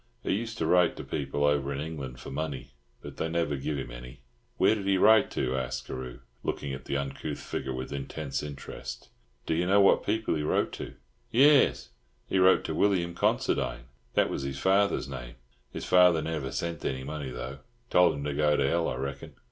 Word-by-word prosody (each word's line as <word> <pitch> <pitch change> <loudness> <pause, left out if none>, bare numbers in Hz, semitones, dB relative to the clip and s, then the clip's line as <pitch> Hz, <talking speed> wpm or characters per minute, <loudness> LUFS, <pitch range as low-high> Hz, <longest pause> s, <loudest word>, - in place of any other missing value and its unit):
He - - 0
used 115 +2 -3
to 80 - -1
write 90 +1 +4
to - - -6
people 70 +1 -2
over 75 -1 +2
in 70 - -3
England 70 -5 -6
for - - -8
money, 70 -2 -4 0.3
but - - -9
they 80 - -1
never 80 -3 0
giv 70 +2 -3
him 65 -3 -5
any." 60 +1 -10 0.4
"Where - - +5
did 100 -3 -3
he 100 -1 +3
write 110 +2 +6
to?" - - 0
asked 65 -2 -3
Carew, 65 -1 -7 0.2
looking 70 -1 -3
at 65 - -7
the 70 - -1
uncouth 70 -1 -4
figure 65 - -4
with 65 +1 -5
intense 70 0 -4
interest. 75 -2 -8 0.4
"Do - - 0
you 85 +2 +1
know 100 +2 +5
what 100 - +5
people 110 +1 0
he 75 - -1
wrote 75 - +1
to?" - - -7 0.4
"Yairs. 140 +4 +5 0.4
He 95 - 0
wrote 95 +1 +5
to - - -3
William 90 -4 +1
Considine. 85 - 0 0.3
That - - +3
was - - -2
his 70 0 -4
father's 95 -3 +2
name. - - -7 0.3
His - - -6
father 90 -3 +5
never 75 -4 -3
sent 85 +3 -3
any 65 -1 -2
money, 75 -1 -5
though. 65 +2 -6 0.3
Told 90 -3 +5
him 70 - -5
to 75 0 -2
go 75 +1 +2
to 70 - +2
hell, 85 +4 +1
I - - -3
reckon." 70 +2 -6
75 Hz, 205 wpm, -28 LUFS, 65-90 Hz, 0.4 s, write